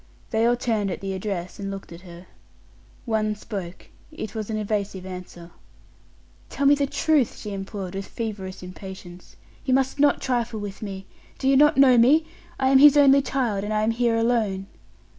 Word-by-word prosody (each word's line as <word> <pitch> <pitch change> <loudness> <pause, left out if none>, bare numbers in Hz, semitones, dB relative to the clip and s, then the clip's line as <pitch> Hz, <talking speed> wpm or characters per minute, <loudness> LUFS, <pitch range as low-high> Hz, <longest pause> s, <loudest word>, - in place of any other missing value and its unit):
They 225 0 +2
all 240 - +3
turned 220 -4 -1
at 180 - -4
the 195 -1 -4
address, 190 -2 -5
and 195 -1 -4
looked 195 -2 -8
at 170 +1 -10
her. 175 -1 -12 0.8
One 215 -2 0
spoke; 190 -4 -7 0.2
it 265 -8 -7
was 220 -2 -5
an 220 - -2
evasive 200 -3 -3
answer. 180 -2 -9 1.0
"Tell 280 - -2
me 280 - +7
the 285 -1 +1
truth!" 295 -3 +1
she 210 - -7
implored, 195 -1 -6
with 195 0 -5
feverish 200 -5 -6
impatience: 185 -1 -11 0.3
"you 260 -1 +2
must 265 +1 0
not 290 0 +4
trifle 240 -3 -2
with 205 -2 -7
me. 195 -2 -6 0.3
Do 265 - -2
you 270 - +5
not 295 +2 +5
know 260 -3 +6
me? 295 +7 +5 0.3
I 265 0 +2
am 265 0 +6
his 290 +1 +8
only 280 -1 +6
child, 240 -8 -1
and 210 - -4
I 215 0 +1
am 220 - +2
here 235 0 +1
alone." 225 -5 0
215 Hz, 185 wpm, -24 LUFS, 195-255 Hz, 1.0 s, his